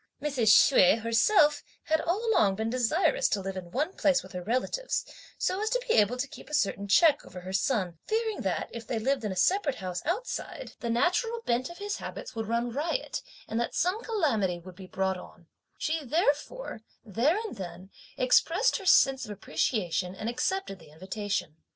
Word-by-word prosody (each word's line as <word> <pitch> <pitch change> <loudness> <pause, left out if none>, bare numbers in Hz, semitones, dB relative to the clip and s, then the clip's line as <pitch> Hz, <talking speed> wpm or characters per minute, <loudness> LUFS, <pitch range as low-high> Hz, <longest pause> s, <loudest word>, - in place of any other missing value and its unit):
Mrs. 275 -6 -1
Hsüeh 215 -1 +6
herself 295 - +4 0.2
had 315 0 +1
all 400 +8 -1
along 195 - +3
been 220 +2 -2
desirous 315 - +2
to 205 - 0
live 195 0 -5
in 180 -2 -7
one 300 - -1
place 285 -7 +2
with - - -13
her 180 -2 -5
relatives, 255 - -1 0.3
so 375 +2 -1
as 435 - 0
to - - -1
be - - +2
able 215 +3 +3
to 270 +3 -2
keep - - -12
a 300 - -1
certain 200 -5 0
check 295 - +5
over 180 - -10
her 185 +1 -7
son, 190 - 0
fearing 445 -1 -1
that, - - -1
if 230 -1 -8
they 240 - -2
lived 260 +3 0
in 210 - -2
a - - -4
separate 300 - +2
house 180 -2 -4
outside, 390 +11 -4
the 235 - -4
natural 360 - +1
bent 245 - 0
of 345 - -10
his 410 0 -3
habits - - -7
would 225 -2 -4
run 235 +1 -1
riot, 320 - -2 0.3
and 225 - -2
that 235 - -2
some 365 +6 +1
calamity 240 - 0
would 180 +1 -12
be 190 0 -11
brought 190 0 -1
on; - - -12
and - - -24 0.3
she 315 0 -1
therefore, 295 - -1 0.2
there 235 - +2
and 415 - -7
then, 185 0 -8 0.3
expressed 335 - +3
her 390 -4 -7
sense 270 -7 +5
of - - -12
appreciation, 180 -1 -1
and 215 +3 -5
accepted 255 - -2
the 160 -2 -16
invitation. 190 0 -4
245 Hz, 195 wpm, -28 LUFS, -, 0.3 s, Hsüeh